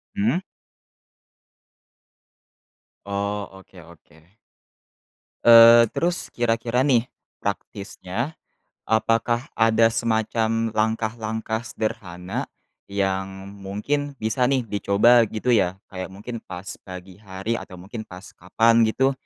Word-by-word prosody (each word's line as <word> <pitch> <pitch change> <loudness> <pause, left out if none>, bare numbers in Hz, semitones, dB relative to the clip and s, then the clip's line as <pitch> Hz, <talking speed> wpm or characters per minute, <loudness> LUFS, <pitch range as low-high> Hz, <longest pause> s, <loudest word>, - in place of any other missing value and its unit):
Mmm? 115 - +1 2.7
Oh, 100 0 -3
oke 95 -1 -15
oke. 80 +1 -20 1.1
Eee, 115 0 +8
terus 175 +1 -2
kira-kira 120 +3 0
nih, 120 -4 +4 0.4
praktisnya, 100 - -4 0.6
apakah 115 +2 +1
ada 115 0 +3
semacam 115 0 0
langkah-langkah 110 0 -2
sederhana, 90 -4 -4 0.4
yang, 95 -1 -2 0.2
mungkin 140 +9 -3
bisa 125 +2 0
nih, 130 -3 +1
dicoba 105 +3 +4
gitu 115 +4 -1
ya? 95 -5 +2 0.2
Kayak 95 0 -5
mungkin 115 +3 -7
pas 90 -3 -9 0.2
pagi 90 0 -11
hari 100 +3 -4
atau 95 - -10
mungkin 100 +5 -9
pas 90 +2 -11
kapan 115 +5 +3
gitu? 135 +4 +2
110 Hz, 95 wpm, -23 LUFS, 95-115 Hz, 2.7 s, Eee